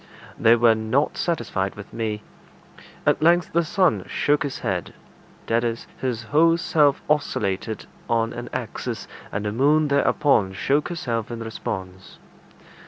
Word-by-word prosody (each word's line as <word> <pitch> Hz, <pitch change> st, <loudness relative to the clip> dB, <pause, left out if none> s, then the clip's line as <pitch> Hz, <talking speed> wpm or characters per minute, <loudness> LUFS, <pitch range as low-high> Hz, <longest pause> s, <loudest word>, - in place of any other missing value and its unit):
They 115 Hz, +1 st, +6 dB
were 120 Hz, -1 st, +5 dB
not 110 Hz, +6 st, 0 dB
satisfied 100 Hz, -, -1 dB
with 100 Hz, 0 st, -11 dB
me. 110 Hz, -2 st, -3 dB, 0.8 s
At -, -, +2 dB
length 175 Hz, +2 st, +3 dB
the 170 Hz, +1 st, +3 dB
sun 165 Hz, -, +2 dB
shook 145 Hz, 0 st, +1 dB
his 145 Hz, -2 st, -2 dB
head; -, -, -3 dB, 0.5 s
that 115 Hz, +1 st, +1 dB
is, 115 Hz, -1 st, -2 dB
his 120 Hz, -3 st, -2 dB
whole 165 Hz, +9 st, +4 dB
self 150 Hz, -4 st, +2 dB
oscillated 110 Hz, -8 st, -1 dB, 0.2 s
on 115 Hz, 0 st, +1 dB
an 120 Hz, 0 st, -6 dB
axis, -, -, -4 dB, 0.2 s
and 100 Hz, +1 st, -3 dB
the 105 Hz, -, -1 dB
moon 145 Hz, +6 st, +3 dB
thereupon 140 Hz, -7 st, +2 dB
shook 140 Hz, +10 st, +1 dB
herself 120 Hz, -10 st, -3 dB
in 120 Hz, -1 st, -5 dB
response. 95 Hz, -4 st, -6 dB
120 Hz, 140 wpm, -23 LUFS, 110-150 Hz, 0.8 s, They